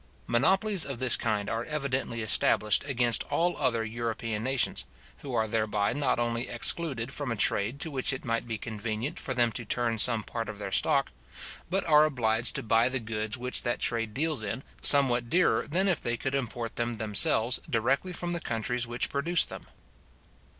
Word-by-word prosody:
Monopolies 190 - +2
of 135 -3 -4
this 130 -1 +5
kind 105 -3 -2
are 115 +1 -3
evidently 135 -6 -3
established 105 -1 +3
against 120 -4 +1
all 175 +1 -1
other 115 -2 0
European 115 -1 -4
nations, 130 - 0 0.4
who 130 -3 -7
are 110 -1 0
thereby 105 -2 -1
not 145 -1 -1
only 120 +1 -2
excluded 130 0 -1
from 145 -5 -4
a - - -2
trade 105 +4 0
to 160 +1 -5
which 130 -1 +2
it 130 0 -6
might 115 0 -2
be 115 -2 -4
convenient 110 +6 -5
for 130 - -4
them 120 -1 +2
to 120 - -5
turn 115 0 -2
some 115 -1 +4
part 115 +1 -6
of 105 - -8
their 100 -1 -7
stock, 135 +7 +1 0.6
but 195 +2 -1
are 150 -1 +5
obliged 115 -6 0
to - - -3
buy 115 +2 +2
the 135 0 -2
goods 110 0 -4
which 125 +1 +1
that 120 -1 -2
trade 115 -2 -1
deals 155 -3 0
in, 115 +5 -5 0.2
somewhat 125 -4 +5
dearer 170 -10 +1
than 185 +6 0
if 180 -5 +1
they 120 0 -2
could 135 +3 -4
import 120 -3 -4
them 120 0 -2
themselves 110 +2 +5
directly 135 +10 -1
from 175 0 -4
the 170 -1 -2
countries 120 0 -3
which 120 +1 -1
produced 165 +5 0
them. - - -9
120 Hz, 185 wpm, -27 LUFS, 115-140 Hz, 0.6 s, this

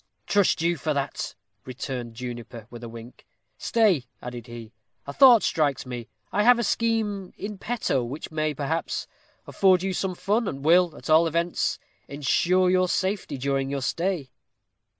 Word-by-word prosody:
"Trust 200 -5 +2
you 170 0 +1
for 155 +1 -2
that," 140 0 -3 0.3
returned 125 -2 -6
Juniper, 120 -2 -7
with 120 0 -10
a 120 - -6
wink. 115 +2 -12 0.3
"Stay," 205 - +2
added 120 -2 -8
he; 120 -1 -10 0.3
"a 140 - -6
thought 250 - +7
strikes 145 -5 0
me. 120 -3 -6 0.2
I 205 - +1
have 245 +3 +6
a 235 - 0
scheme 215 -4 -1
in 205 -1 -6
petto 220 - -1
which 135 +8 -6
may, 155 -1 -1
perhaps, 150 +4 -2 0.4
afford 185 -2 +3
you 190 0 -1
some 185 0 -2
fun, 205 +5 0
and 135 -4 -5
will, 170 -1 +4
at - - -10
all 160 +2 +6
events, 170 +2 0 0.3
insure 175 +6 +2
your 185 0 +3
safety 190 -6 -1
during 135 0 -1
your 140 -1 -3
stay." 170 -3 -2
155 Hz, 160 wpm, -25 LUFS, 130-190 Hz, 0.4 s, thought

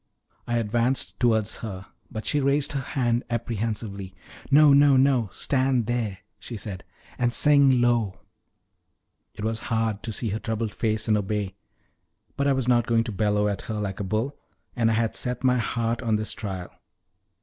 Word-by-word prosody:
I 120 - 0
advanced 120 +3 0
towards 110 -3 +2
her, 95 -4 -7 0.2
but 110 - -6
she 150 - +1
raised 140 +1 +2
her 140 - -2
hand 120 -2 0
apprehensively. 110 -4 -3 0.3
"No, 145 0 +7
no, 140 -1 +6
no; 130 -5 +3
stand 130 -2 +1
there," 115 -4 -2 0.2
she 120 - -7
said, 100 -2 -6 0.4
"and 120 -1 +2
sing 140 0 +5
low." 120 -5 +1 1.2
It 105 - -7
was 110 +1 -1
hard 110 -2 0
to 115 - -4
see 110 +1 -2
her 105 +2 -2
troubled 110 -1 -3
face 110 -1 -1
and 110 - +4
obey, 105 -1 -2 0.8
but 140 - 0
I 140 - +4
was 130 -2 -1
not 120 -2 +3
going 115 -1 +3
to 115 - -4
bellow 105 0 +1
at 100 -2 -2
her 110 - -2
like 100 -2 -4
a - - -2
bull, 110 +8 -2 0.4
and 115 -3 +2
I 110 - +2
had 115 -1 0
set 125 0 -2
my 125 -1 +3
heart 115 +1 -1
on 115 -3 +1
this 105 -1 -1
trial. 95 -4 -6
115 Hz, 175 wpm, -25 LUFS, 105-125 Hz, 1.2 s, No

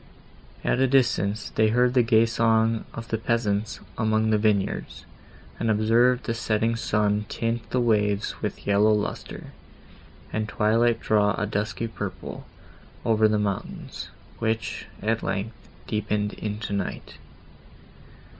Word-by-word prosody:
At - - +1
a 135 - +4
distance, 110 -6 +1
they 110 - +3
heard 125 +3 +3
the 125 - +5
gay 115 -1 +4
song 115 -1 +2
of 115 0 -8
the 115 - -1
peasants 110 -2 -1 0.2
among 110 0 +2
the 105 - +3
vineyards, 105 -2 0 0.5
and 115 - 0
observed 115 +4 +3
the 115 - -1
setting 115 0 0
sun 105 -2 0
tint 115 0 -2
the 125 - 0
waves 105 -3 +1
with - - -4
yellow 100 +2 +4
lustre, 105 -1 -4 0.8
and 110 0 -1
twilight 115 +2 +2
draw 105 -1 +2
a 105 - 0
dusky 105 +2 -2
purple 115 - -6 0.6
over 110 -1 +4
the 105 0 +1
mountains, 100 -2 -4 0.3
which, 110 -1 -2 0.2
at 110 +1 +1
length, 100 +4 -2 0.3
deepened 105 -1 -1
into 105 0 -4
night. 100 -2 -4
110 Hz, 130 wpm, -25 LUFS, 105-115 Hz, 0.8 s, the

